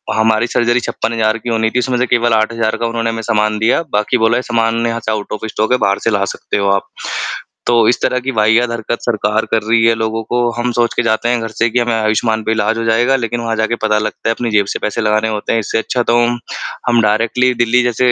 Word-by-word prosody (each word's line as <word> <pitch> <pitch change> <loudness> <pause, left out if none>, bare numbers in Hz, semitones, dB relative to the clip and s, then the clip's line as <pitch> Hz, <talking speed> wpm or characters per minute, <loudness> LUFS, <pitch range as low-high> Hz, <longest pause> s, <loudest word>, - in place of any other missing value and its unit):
हमारी 110 +1 +2
सर्जरी 120 0 +1
56,000 115 -2 -1
की 115 +2 -6
होनी 110 -1 +1
थी, 125 - -1
उसमें 125 0 -1
से 125 - +1
केवल 120 -1 +2
8,000 110 0 +1
का 115 - -2
उन्होंने 115 0 -2
हमें 115 0 -3
सामान 110 -1 0
दिया, 110 +8 +2
बाकी 105 +4 +1
बोला 115 +1 +2
है, - - -1
"सामान 115 -1 0
यहाँ 115 0 -2
से 110 - 0
आउट 105 -1 -3
ऑफ़ 105 - -5
स्टॉक 110 +2 -2
है। 125 - +4
बाहर 100 -4 +1
से - - +2
ला 100 -2 +1
सकते 100 - -4
हो 100 -1 +1
आप।" 100 0 0 0.8
तो 120 -2 +4
इस 120 - +1
तरह 125 - +1
की 135 +2 -3
वाहियात 110 +2 +3
हरकत 115 0 -3
सरकार 110 -1 0
कर 110 - +2
रही 115 +1 +2
है 115 - +5
लोगों 110 0 -2
को, 120 +1 0
हम 120 +1 -2
सोच 120 0 +1
के - - +1
जाते 115 +1 0
हैं 120 -1 +1
घर 115 - -4
से 115 +1 0
कि 120 +2 +1
हमें 120 -1 0
आयुष्मान 110 0 0
पे 110 - -1
इलाज 110 0 0
हो 115 - -2
जाएगा, 120 +4 +3
लेकिन 120 -2 -2
वहाँ 115 -1 -2
जा 110 - +2
के 115 - -1
पता 105 -1 +2
लगता 105 +1 -3
है, - - +3
अपनी 120 -1 -3
जेब 105 -1 +3
से - - -3
पैसे 105 +2 -2
लगाने 110 +1 +1
होते 105 -1 -2
हैं, 115 - +2
इससे 105 - -2
अच्छा 120 +2 -1
तो 120 - +1
हम 120 0 -1 0.5
हम 120 -1 +4
डायरेक्टली 115 +4 +2
दिल्ली 120 +1 +2
जैसे 120 +1 +2
115 Hz, 260 wpm, -16 LUFS, 110-120 Hz, 0.8 s, है